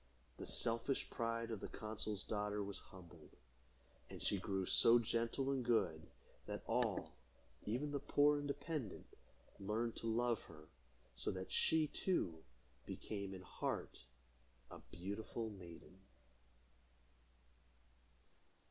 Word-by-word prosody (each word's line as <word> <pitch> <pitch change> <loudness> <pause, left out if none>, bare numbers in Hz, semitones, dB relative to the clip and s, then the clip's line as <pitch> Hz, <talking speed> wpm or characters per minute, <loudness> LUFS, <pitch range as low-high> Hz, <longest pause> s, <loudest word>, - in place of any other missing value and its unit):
The - - -6
selfish 115 +3 +1
pride 115 0 -1
of 110 - -2
the - - -4
consul's 110 -1 -3
daughter 105 -1 0
was 100 0 -4
humbled, 90 -3 -13 0.7
and - - -7
she 100 - +1
grew 95 0 0
so 115 +5 +7
gentle 115 +3 +1
and 135 -2 +1
good, 95 -10 +2 0.4
that - - -3
all, - - +1 0.5
even 130 +7 0
the 140 - 0
poor 145 +1 +5
and 145 - -3
dependent, 140 - -3 0.5
learned 110 +4 0
to 115 - -3
love 120 +1 +2
her, 75 -2 -12 0.5
so - - -2
that 95 0 -3
she, 160 -1 +4
too, 90 - 0 0.4
became, 100 -2 -3
in 95 - -8
heart, - - -2 0.7
a - - -7
beautiful 105 +4 -3
maiden. 90 -1 -11
110 Hz, 120 wpm, -41 LUFS, 95-120 Hz, 0.7 s, so